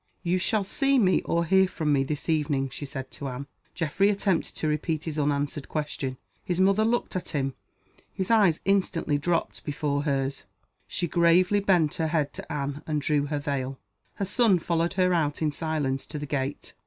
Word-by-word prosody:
"You 180 +1 +1
shall 205 +3 +1
see 275 +7 +2
me, 190 -6 +4
or 170 0 +1
hear 190 +3 +4
from 155 -5 0
me, 135 -1 +3
this 145 +1 -4
evening," 145 -4 +1
she 145 +2 -7
said 135 -1 -6
to 140 - -6
Anne. 130 +1 -5 0.3
Geoffrey 170 +5 +2
attempted 200 -3 0
to 155 - -2
repeat 155 +1 -1
his 155 -2 -3
unanswered 145 0 -1
question. 145 -4 -3 0.3
His 180 -2 -2
mother 195 +3 +4
looked 235 -1 0
at 185 - -3
him. 135 -2 -1 0.6
His 190 +3 -2
eyes 200 -8 +4
instantly 185 -6 +1
dropped 170 +3 -1
before 145 -1 -1
hers. 135 -2 -1 0.4
She 175 - -2
gravely 175 +4 +4
bent 180 -7 +3
her 160 - +1
head 155 -3 0
to - - -8
Anne, 145 0 -3
and 155 -1 0
drew 145 0 +1
her 150 0 -1
veil. 135 -2 -3 0.4
Her 200 - -2
son 210 -1 +3
followed 170 0 0
her 180 -1 +2
out 150 -4 +1
in 155 -2 +1
silence 145 -4 -2
to - - -6
the 145 - -4
gate. 140 -1 -3
155 Hz, 190 wpm, -27 LUFS, 145-185 Hz, 0.6 s, me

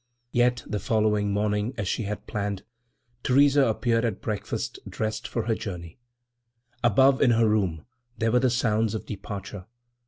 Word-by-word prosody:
Yet 120 0 +2
the 105 - -3
following 105 -2 +1
morning, 105 +4 0
as 105 -3 -2
she 110 - -1
had 105 +1 -5
planned, 100 -2 -3 0.6
Theresa 140 +1 +4
appeared 115 +1 +1
at 110 -4 -1
breakfast 105 -2 -4
dressed 110 0 -3
for 115 - -2
her 115 +1 0
journey. 90 -5 -6 0.8
Above 130 +4 +4
in 130 - +5
her 115 -1 +4
room 95 -7 0 0.3
there 115 0 +1
were 125 - +4
the 130 0 +3
sounds 115 -3 +1
of 110 - -5
departure. 100 -1 -7
110 Hz, 155 wpm, -26 LUFS, 105-120 Hz, 0.8 s, in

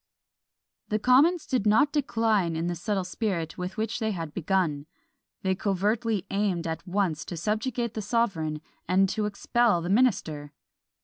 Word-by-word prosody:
The 215 - +1
commons 285 +10 +4
did 250 -6 0
not 225 +8 +4
decline 225 - +1
in 165 +1 -2
the 175 - -1
subtle 190 +3 -2
spirit 180 -4 -3
with 180 +3 -5
which 220 +1 -2
they 220 -2 0
had 165 -7 -4
begun; 165 -5 0 0.6
they 190 0 +2
covertly 205 +2 0
aimed 195 -4 0
at 160 +3 -4
once 180 -5 0
to 175 - -6
subjugate 220 +5 -1
the 215 - -3
sovereign, 190 -9 -1 0.3
and 190 +2 +4
to 210 +2 -1
expel 210 0 +2
the 170 +1 -4
minister! 160 - +1
200 Hz, 150 wpm, -27 LUFS, 175-225 Hz, 0.6 s, commons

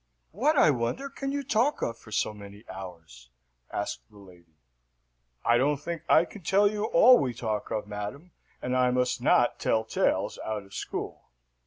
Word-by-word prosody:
"What, 285 - +1
I 155 - +6
wonder, 140 - -2
can 275 0 -4
you 285 0 -2
talk 255 +3 +1
of 115 - -2
for 110 - -16
so 105 - 0
many 100 +1 -12
hours?" 85 -10 -10 0.4
asked 105 - -4
the 105 - -19
lady. 90 -5 -18 0.9
"I 120 +1 +4
don't 145 +3 +2
think 165 +3 -5
I 160 - +6
can 205 - -12
tell 195 +5 +3
you 210 0 -2
all 240 +5 +6
we 125 -3 -2
talk 110 -3 -3
of, 105 - -2
madam, 105 - -7 0.3
and 125 0 -1
I 125 -1 +3
must 125 0 0
not - - +3
tell 110 - +1
tales 110 - 0
out 110 -2 -3
of 95 0 -18
school. - - -6
120 Hz, 180 wpm, -28 LUFS, -, 0.9 s, I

